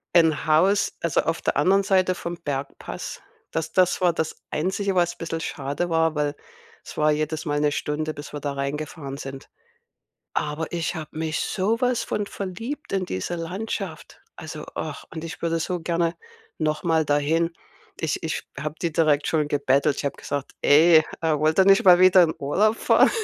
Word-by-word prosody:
Ein 160 -3 +4
Haus, 185 +6 +3
also 170 -4 +2
auf 165 +1 -2
der - - 0
anderen 190 +7 +4
Seite 190 -2 +2
vom 175 -1 -5
Bergpass, 140 -4 -5 0.3
das 160 0 -3
das 185 -1 +3
war 180 -2 +3
das 160 -1 -2 0.2
Einzige, 190 +5 -1
was 175 -1 +1
bissel 165 0 -4
schade 145 +4 -3
war, 160 -1 +2
weil 150 -1 -1 0.5
es - - -9
war 155 0 +3
jedes 155 +1 -2
Mal 145 -1 0
'ne 150 0 +2
Stunde, 155 +1 -2
bis 145 - -9
wir 150 - -5
da 145 0 -3
rein 140 +1 -2
gefahren 145 -2 -6
sind. 135 -1 -8 0.9
Aber 155 +2 -2
ich 170 -1 -2
habe 155 -1 -8
mich 160 0 -1
so 215 +5 0
was 250 -2 +1
von 205 - -2
verliebt 225 +11 -6
in 190 -2 0
diese 95 - -3
Landschaft. 180 +6 -5 0.2
Also, - - -8
ach, - - -5
und 160 0 -5
ich 165 +2 -7
würde 165 0 0
so 180 +2 -2
gerne 170 0 0 0.4
noch 155 -1 -1
mal 160 -2 +2
dahin. 160 +4 +1 0.4
Ich 160 -1 -2
ich 160 - -2 0.2
habe 150 +1 -4
die 170 -2 0
direkt 150 -2 +2
schon 155 -2 +1
gebettelt. 140 0 +2
Ich - - -4
habe 140 - -2
gesagt: 145 -1 -4
„Ey, 160 +2 +6 0.2
äh, 155 -2 +2
wollt 155 +3 +1
ihr 190 - +7
nicht 195 0 +5
mal 180 -2 +8
wieder 185 0 +7
in 160 - -1
Urlaub 205 +10 +2
fahren?“ - - +4
160 Hz, 185 wpm, -24 LUFS, 150-180 Hz, 0.9 s, mal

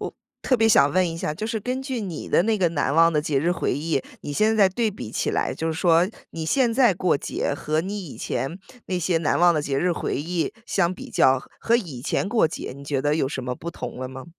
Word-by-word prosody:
我 - - -4 0.3
特 255 - +2
别 225 -1 +3
想 145 -9 +5
问 185 +1 +2
一 165 - -5
下， 150 - -2
就 215 - -4
是 225 -2 -2
根 250 +4 -2
据 265 -3 -3
你 180 -7 -5
的 - - +4
那 220 +3 +1
个 180 -5 +2
难 145 -4 0
忘 165 +1 +5
的 150 - +2
节 150 -2 0
日 170 +5 +1
回 175 - -1
忆， 150 -1 -1 0.2
你 145 - -5
现 215 +8 +2
在 205 -2 +6
对 220 +4 0
比 190 - -8
起 - - -1
来， - - -1
就 160 - -3
是 160 - -1
说 170 +2 +3 0.2
你 165 -1 -5
现 245 +3 +2
在 240 -5 +4
过 180 -3 +2
节 - - -2
和 155 +2 -1
你 195 0 -5
以 - - -10
前 165 +8 -3 0.3
那 180 -1 -1
些 170 0 +1
难 160 - +1
忘 175 0 +6
的 155 - 0
节 140 -2 -1
日 180 +4 +1
回 - - -3
忆 165 +5 -2
相 180 -2 +1
比 - - -10
较， 130 0 +4 0.2
和 235 - +3
以 165 - -5
前 150 - -1
过 215 -6 +3
节， 160 - -6
你 140 - -11
觉 140 -1 -1
得 145 +1 +2
有 150 -4 0
什 135 -2 -5
么 125 0 -2
不 170 +6 -6
同 130 - -7
了 130 - -4
吗？ 130 0 -9
170 Hz, 285 characters per minute, -24 LUFS, 150-200 Hz, 0.3 s, 在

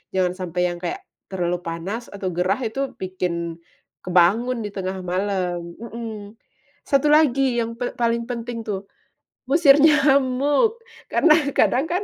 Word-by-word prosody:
Jangan 180 -1 +1
sampai 180 -1 -3
yang 175 - -6
kayak, 370 - -4 0.3
terlalu 175 -1 -1
panas 185 +8 -5
atau 195 -2 -5
gerah. 180 +4 +1
Itu 270 +4 -2
bikin 170 -3 -4 0.5
kebangun 205 +8 +2
di - - -4
tengah 190 -1 -4
malam 180 -2 -2
mhm. 225 -2 -8 0.5
Satu 275 0 +2
lagi 275 -4 +3
yang 230 0 -2
pe 245 - -3
paling 235 -1 0
penting 235 -1 -5
tuh, 195 -1 -4 0.6
ngusir 290 -2 +6
nyamuk. 290 - +3 0.3
Karena 325 - +4 0.2
kadang 265 +5 +3
kan 365 +4 -1
225 Hz, 135 wpm, -22 LUFS, 185-270 Hz, 0.6 s, ngusir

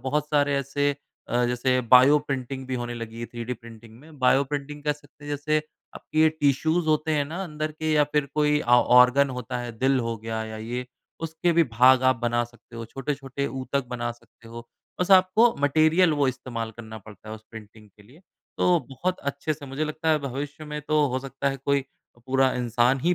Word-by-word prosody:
बहुत 150 +3 -1
सारे 145 -1 +2
ऐसे 145 +1 -1 0.3
अ, 120 +1 +1
जैसे 125 +1 +1
बायो 130 +4 +7
प्रिंटिंग 135 -2 -5
भी 130 - -3
होने 120 -1 -4
लगी 115 0 -7
है, 120 - -4
थ्रीडी 120 +1 -6
प्रिंटिंग 115 -1 -14
में। 150 -1 -16
बायो 130 +2 +4
प्रिंटिंग 145 +1 -5
कह 150 - +2
सकते 145 0 -17
हैं, - - -8
जैसे 145 +2 0 0.4
आपकी 155 - -3
ये 160 - +6
टिश्यूज़ 155 +2 +1
होते 155 0 +1
हैं 145 - +1
ना, 170 +6 -5
अंदर 155 -1 -4
के 155 0 -2
या 150 -1 +4
फिर 150 -2 +1
कोई 150 0 +2
ऑ 120 - +3 0.2
ऑर्गन 130 +2 +6
होता 125 0 -4
है, 120 -1 -5
दिल 135 0 +2
हो 115 -1 -3
गया 110 0 -4
या 110 0 -7
ये, 120 +3 -5 0.3
उसके 165 +2 -1
भी 170 0 +4
भाग 130 +2 +5
आप 130 - +3
बना 120 0 +1
सकते 115 0 -16
हो। 115 - -5
छोटे-छोटे 135 +2 -4
ऊतक 135 0 -3
बना 120 -1 -2
सकते 115 -1 -20
हो। 115 +1 -10 0.3
बस 180 +2 0
आपको 190 +5 +5
मटीरियल 155 +4 +4
वो 145 -3 +1
इस्तेमाल 115 -3 -5
करना 110 -1 -9
पड़ता 105 +1 -14
है, 110 - -5
उस 110 0 -13
प्रिंटिंग 110 -1 -13
के 105 - -21
लिए। 130 - -19 0.4
तो 175 -1 +4
बहुत 180 +7 -2
अच्छे 150 +2 -3
से 140 -1 -11
मुझे 135 +3 -3
लगता 155 +1 -2
है, 155 - +3
भविष्य 145 +4 -6
में 150 0 -5
तो 155 -1 +3
हो 130 - 0
सकता 135 +1 -3
है, 135 - -3
कोई 140 0 0 0.4
पूरा 130 0 +2
इन्सान 120 +2 +1
ही 175 +5 +2
135 Hz, 210 wpm, -25 LUFS, 120-150 Hz, 0.4 s, बायो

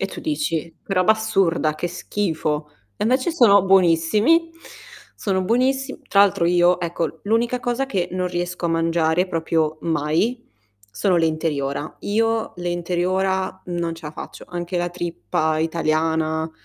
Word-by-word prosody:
E - - 0
tu - - -8
dici: 170 - -2
"Che 195 - -5
roba 185 +3 +4
assurda, 190 -8 +1
che 175 +3 -3
schifo!" 160 -5 -2 0.3
E - - -2
invece 255 +7 +2
sono 210 - +6
buonissimi, 195 - +3 0.6
sono 190 -2 -1
buonissim 265 +6 0
tra 200 - +4
l'altro 190 -4 +4
io, 175 +1 +4
ecco, 165 -2 -3
l'unica 235 +4 0
cosa 245 +3 -1
che 185 -9 -1
non 185 0 -1
riesco 175 0 -3
a - - -1
mangiare 165 +1 +1
proprio 160 -2 -1
mai, 165 +10 0 0.5
sono 175 - +1
le 165 - +3
interiora. 150 -2 -2
Io 225 +2 0
le 175 0 -4
interiora 185 +2 -1
non 170 -2 -2
ce 165 -1 -13
la 150 - -7
faccio, - - -9
anche 175 0 -4
la 175 0 -1
trippa 160 - -2
italiana 160 0 0
175 Hz, 150 wpm, -22 LUFS, 160-200 Hz, 0.6 s, sono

